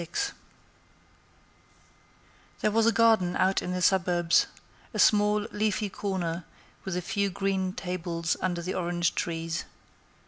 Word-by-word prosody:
XXXVI 405 Hz, -, -2 dB, 2.3 s
There 215 Hz, -, +2 dB
was 225 Hz, +1 st, +3 dB
a -, -, +6 dB
garden 220 Hz, -5 st, +3 dB
out 190 Hz, +1 st, +2 dB
in 180 Hz, -, -4 dB
the 180 Hz, 0 st, -2 dB
suburbs; 175 Hz, -3 st, +3 dB, 0.5 s
a -, -, -1 dB
small, 210 Hz, 0 st, +4 dB
leafy 210 Hz, -1 st, 0 dB
corner, 180 Hz, -4 st, -3 dB, 0.4 s
with 190 Hz, -2 st, -3 dB
a 180 Hz, -, -3 dB
few 200 Hz, 0 st, 0 dB
green 190 Hz, -1 st, -1 dB
tables 175 Hz, -3 st, -2 dB
under 175 Hz, -1 st, -1 dB
the 185 Hz, -, -3 dB
orange 175 Hz, -1 st, 0 dB
trees. 165 Hz, -1 st, -3 dB
185 Hz, 130 wpm, -28 LUFS, 175-205 Hz, 2.3 s, a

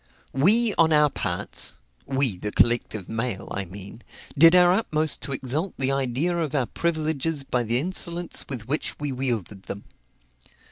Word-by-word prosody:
We, 210 Hz, -, +4 dB
on 165 Hz, -1 st, +5 dB
our 150 Hz, -2 st, +4 dB
parts, 90 Hz, -8 st, -2 dB, 0.3 s
(we, 135 Hz, -6 st, 0 dB
the 105 Hz, +3 st, -5 dB
collective 115 Hz, -5 st, +1 dB
mail, 115 Hz, -3 st, -3 dB
I 100 Hz, -, -2 dB
mean,) 100 Hz, +5 st, -10 dB, 0.3 s
did 165 Hz, +4 st, +7 dB
our 180 Hz, -1 st, +6 dB
utmost 155 Hz, -7 st, 0 dB
to -, -, -3 dB
exalt 140 Hz, +7 st, -1 dB
the 135 Hz, 0 st, 0 dB
idea 135 Hz, +6 st, 0 dB
of 160 Hz, -4 st, -2 dB
our 135 Hz, -3 st, +2 dB
privileges 160 Hz, -1 st, -2 dB
by 125 Hz, -2 st, -1 dB
the 115 Hz, +1 st, 0 dB
insolence 175 Hz, +2 st, 0 dB
with 120 Hz, -5 st, -6 dB
which 150 Hz, +4 st, -2 dB
we 145 Hz, -1 st, -3 dB
wielded 120 Hz, -7 st, -3 dB
them. 100 Hz, -, -7 dB
135 Hz, 155 wpm, -24 LUFS, 120-160 Hz, 0.3 s, did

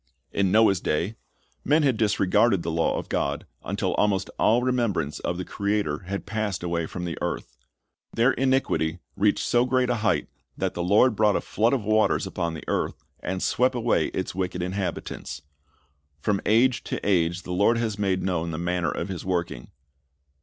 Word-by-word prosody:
In 95 Hz, -2 st, +1 dB
Noah's 105 Hz, -4 st, +4 dB
da}', 85 Hz, +8 st, 0 dB, 0.5 s
men 150 Hz, +2 st, +3 dB
had 135 Hz, -4 st, +3 dB
disregarded 100 Hz, -2 st, +2 dB
the 85 Hz, -, -2 dB
law 80 Hz, 0 st, +1 dB
of -, -, -5 dB
God, 70 Hz, +1 st, -1 dB, 0.2 s
until -, -, -1 dB
almost 100 Hz, -2 st, +1 dB
all 120 Hz, +3 st, +4 dB
remembrance 120 Hz, -, 0 dB
of 85 Hz, -, -2 dB
the 90 Hz, -, -4 dB
Creator 100 Hz, -6 st, -1 dB
had 100 Hz, +1 st, -4 dB
passed 105 Hz, -4 st, -2 dB
away 85 Hz, -2 st, -1 dB
from 90 Hz, -1 st, -5 dB
the 85 Hz, -, -4 dB
earth. -, -, -4 dB, 0.6 s
Their 120 Hz, +3 st, +3 dB
iniquity 130 Hz, -12 st, +1 dB, 0.2 s
reached 100 Hz, +1 st, +2 dB
so 120 Hz, 0 st, +3 dB
great 125 Hz, 0 st, +1 dB
a 120 Hz, -, 0 dB
hei'dit 110 Hz, -3 st, +1 dB, 0.3 s
that -, -, -1 dB
the 85 Hz, -, -3 dB
Lord 105 Hz, +7 st, +4 dB
brought 105 Hz, -1 st, +3 dB
a -, -, +2 dB
flood 115 Hz, +4 st, +1 dB
of 130 Hz, -6 st, 0 dB
waters 110 Hz, +1 st, +2 dB
upon 85 Hz, -1 st, -3 dB
the 80 Hz, -, -9 dB
earth, -, -, -2 dB, 0.2 s
and 95 Hz, +1 st, -3 dB
swept 125 Hz, +1 st, +2 dB
away 115 Hz, -9 st, +1 dB
its 95 Hz, -, -4 dB
wicked 90 Hz, -1 st, -2 dB
inhabitants. 90 Hz, -5 st, -4 dB, 0.8 s
From 100 Hz, +5 st, 0 dB
age 120 Hz, +3 st, +3 dB
to -, -, -3 dB
age 85 Hz, -2 st, +2 dB
the 90 Hz, -, -5 dB
Lord 100 Hz, +6 st, +3 dB
has 110 Hz, -3 st, -2 dB
made 95 Hz, -2 st, 0 dB
known 85 Hz, -3 st, -1 dB
the 80 Hz, -, -4 dB
manner 85 Hz, 0 st, 0 dB
of -, -, -3 dB
His 95 Hz, -4 st, -5 dB
working. 85 Hz, -9 st, -2 dB
100 Hz, 180 wpm, -25 LUFS, 90-115 Hz, 0.8 s, Noah's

